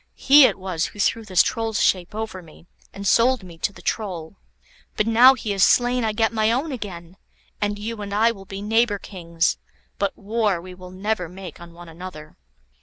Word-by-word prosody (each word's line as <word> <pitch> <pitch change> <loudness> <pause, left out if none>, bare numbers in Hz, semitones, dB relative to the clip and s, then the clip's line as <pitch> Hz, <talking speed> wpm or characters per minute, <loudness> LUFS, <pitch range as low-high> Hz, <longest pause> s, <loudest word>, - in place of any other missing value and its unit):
He 280 0 +7
it - - +1
was 185 -3 -2
who 205 - -14
threw 225 +2 0
this 185 -4 +4
Troll's 225 -2 -2
shape 180 +1 +1
over 220 -4 -5
me, 165 0 -17 0.3
and 200 +1 -8
sold 240 +2 +3
me 170 -3 -13
to - - -1
the - - -16
Troll. 185 -6 -4 0.6
But 215 - +2
now 240 +4 +7
he 220 -4 -3
is 195 -1 +2
slain 245 0 +3
I 220 - +1
get 225 +1 0
my 220 0 +2
own 275 +6 -1
again, 185 -7 -8 0.4
and 205 0 -1
you 215 +1 -5
and 200 -1 -6
I 220 +3 +3
will 195 -4 -11
be 195 +1 -7
neighbour 225 0 +2
kings, 170 -4 -2 0.4
but 200 -1 -1
war 210 -3 0
we 180 +2 -10
will 180 0 -12
never 185 -1 -3
make 180 -2 -10
on 170 -1 -12
one 175 0 -12
another." 165 -2 -10
200 Hz, 200 wpm, -22 LUFS, 180-225 Hz, 0.6 s, He